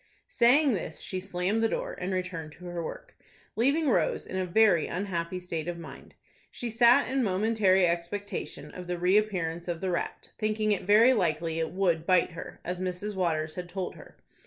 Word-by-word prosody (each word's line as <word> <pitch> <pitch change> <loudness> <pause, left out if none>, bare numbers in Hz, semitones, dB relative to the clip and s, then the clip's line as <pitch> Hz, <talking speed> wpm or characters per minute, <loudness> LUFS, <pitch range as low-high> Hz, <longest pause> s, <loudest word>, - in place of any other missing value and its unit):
Saying 260 +3 +4
this, 170 -5 -4
she 185 - -4
slammed 190 +3 -1
the 225 - +2
door, - - -3
and 180 +1 -4
returned 180 -4 -4
to 180 - -13
her 175 -1 -4
work, - - -8 0.4
leaving 280 +7 +2
Rose 180 - +1
in - - -7
a 185 -1 -1
very 180 -3 +4
unhappy 180 -1 -3
state 170 -3 -5
of 175 -1 -3
mind. 165 -2 -11 0.3
She 240 -1 -5
sat 240 +4 +5
in 265 +1 0
momentary 195 -2 +3
expectation 175 +4 -3
of 180 -1 -9
the 180 0 -2
reappearance 180 -3 +1
of 170 -2 -2
the 190 0 -2
rat, 175 - -4
thinking 215 -1 0
it 200 - -1
very 225 +5 +7
likely 165 -5 0
it 160 -1 -1
would 175 -4 0
bite 185 -2 +3
her, 165 - -9
as 180 0 -3
Mrs. 185 +3 -3
Waters 160 -4 -1
had 180 -1 -6
told 185 0 -4
her. - - -15
185 Hz, 185 wpm, -28 LUFS, 170-215 Hz, 0.4 s, very